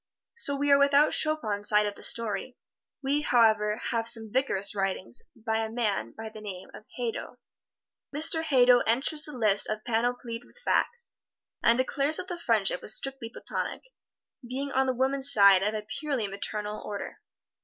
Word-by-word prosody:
So 285 -12 +2
we 285 +1 0
are 280 - +6
without 280 +1 +4
Chopin's 220 -10 0
side 210 0 +4
of 205 - -3
the - - -15
story. 230 +2 0 0.5
We, 280 +2 +1
however, 220 -5 +3
have 230 -2 -1
some 225 -2 +2
vigorous 225 -7 +2
writing 195 - -3 0.2
by 220 0 -2
a 225 0 -2
man 225 -3 -2
by 220 0 -6
the 215 0 -12
name 190 -3 -8
of 215 - -12
Hadow. 240 -2 -4 0.7
Mr. 315 +2 +2
Hadow 250 -5 +5
enters 270 +6 0
the 300 - -9
lists 210 -3 +2 0.2
panoplied 240 0 -2
with 245 - -21
facts, 480 0 -1 0.4
and 235 - +4
declares 280 +4 +1
that 370 - -6
the 350 -1 -5
friendship 215 - +1
was 215 - +4
strictly 270 -4 -5
platonic, - - -5 0.5
being 265 +3 -5
on 265 0 +1
the 260 - 0
woman's 270 +2 +1
side 200 -2 +6
of 210 +2 -1
a 215 - -4 0.2
purely 275 -8 -2
maternal 210 +1 -4
order. 205 -1 -7
235 Hz, 165 wpm, -27 LUFS, 210-275 Hz, 0.7 s, are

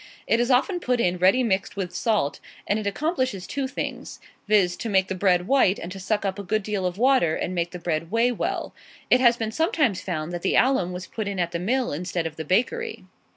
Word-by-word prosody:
It 230 - +2
is 240 +1 +1
often 275 +9 +2
put 250 -7 0
in 180 -4 +1
ready 190 +8 +4
mixed 190 -5 -1
with 185 -3 -4
salt, 210 - 0 0.3
and 205 - 0
it 210 - -3
accomplishes 260 - -1
two 275 +5 -3
things, 265 - -5 0.3
viz., 195 -4 +3
to 230 - -4
make 190 -2 +2
the - - -1
bread 185 -1 +2
white, 260 -8 +4
and 170 - -7
to 195 - -7
suck 205 +2 -1
up 195 +1 -2
a - - -5
good 215 +3 -1
deal 195 -3 -1
of 180 +1 -5
water, 245 -9 +3
and 185 - -3
make 170 -1 -1
the 180 - -7
bread 165 -1 -2
weigh 230 +4 +2
well. 240 - -3 0.4
It 250 - +6
has 240 -1 +5
been 225 -2 -3
sometimes 310 - +1
found 160 -3 -4
that 175 - -4
the 190 - +1
alum 255 -9 +3
was 180 0 -6
put 215 +1 -5
in 200 -1 -3
at 175 -1 -1
the 170 - -3
mill 245 - 0
instead 175 +2 -3
of 160 -1 -4
the 160 - -6
bakery. 445 - -1
200 Hz, 240 wpm, -24 LUFS, 180-245 Hz, 0.4 s, It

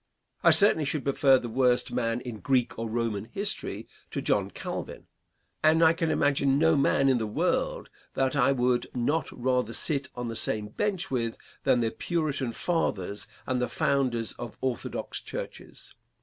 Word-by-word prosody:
I - - +7
certainly 200 -6 +5
should 145 0 -1
prefer 140 -1 +4
the 125 - -5
worst 125 +1 +2
man 120 -1 -1
in 120 -4 -7
Greek 130 -4 0
or 115 0 -3
Roman 110 -3 -2
history 200 - -2 0.2
to - - -3
John - - +1
Calvin; - - -6 0.6
and 160 +1 +4
I 160 0 +6
can 165 -1 -1
imagine 140 -2 +2
no 160 +1 +4
man 135 -1 +3
in 130 -2 +3
the 110 - -2
world 105 - -1 0.2
that 135 +1 +1
I 135 -1 +4
would 125 -2 +1
not 140 +5 0
rather 125 -2 0
sit 140 0 0
on 125 -1 -4
the 115 - -4
same 105 -1 -2
bench 195 - -2
with 115 -3 -1 0.3
than 130 -3 +4
the 115 -1 0
Puritan 150 -7 -2
fathers 105 - -2 0.2
and 125 -1 -1
the 125 - 0
founders 120 -2 0
of 120 - -7
orthodox 130 -2 -3
churches. - - -8
130 Hz, 165 wpm, -28 LUFS, 120-145 Hz, 0.6 s, I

